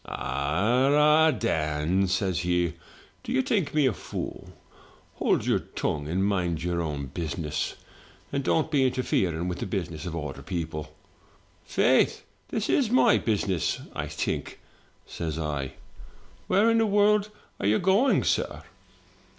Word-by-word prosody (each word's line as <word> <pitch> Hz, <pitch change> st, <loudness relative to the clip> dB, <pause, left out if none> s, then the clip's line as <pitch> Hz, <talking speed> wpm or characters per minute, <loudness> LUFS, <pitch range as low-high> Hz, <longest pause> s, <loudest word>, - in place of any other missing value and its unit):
'* -, -, -20 dB
'Arrahy 130 Hz, -, +3 dB
Dan,' 80 Hz, -1 st, 0 dB
says 95 Hz, -1 st, 0 dB
he, 90 Hz, -1 st, 0 dB, 0.5 s
*do -, -, -6 dB
you 130 Hz, -, +2 dB
think 185 Hz, -, 0 dB
me 150 Hz, -2 st, +2 dB
a 130 Hz, -, +3 dB
fool? -, -, -6 dB, 0.7 s
Hold -, -, +1 dB
your -, -, +2 dB
tongue, 75 Hz, -1 st, -3 dB
and 95 Hz, +5 st, 0 dB
mind 90 Hz, -5 st, 0 dB
your 85 Hz, -1 st, -1 dB
own 75 Hz, -4 st, -3 dB
business, 75 Hz, +1 st, -3 dB, 0.6 s
and 140 Hz, -1 st, 0 dB
don't 160 Hz, +3 st, +1 dB
be 135 Hz, -4 st, +3 dB
interfering 95 Hz, -9 st, 0 dB
with 90 Hz, -, -3 dB
the -, -, -3 dB
business 90 Hz, -3 st, -4 dB
of 85 Hz, -, -4 dB
other 75 Hz, -4 st, -5 dB
people.' 80 Hz, -4 st, -5 dB, 0.7 s
'Faith, -, -, +3 dB, 0.3 s
this 220 Hz, -1 st, -2 dB
is 255 Hz, -6 st, +2 dB
my 240 Hz, -2 st, +5 dB
business, 100 Hz, -5 st, 0 dB
I -, -, -3 dB
think,' -, -, -3 dB, 0.5 s
says 80 Hz, -2 st, -4 dB
I. 70 Hz, -4 st, -3 dB, 0.7 s
'Where 215 Hz, +4 st, +4 dB
in 230 Hz, -, +3 dB
the 225 Hz, -, +3 dB
world 205 Hz, 0 st, +3 dB, 0.3 s
are 95 Hz, -, 0 dB
you 105 Hz, +2 st, +4 dB
going, 195 Hz, +9 st, +3 dB
sir?' -, -, -1 dB
95 Hz, 140 wpm, -27 LUFS, -, 0.7 s, my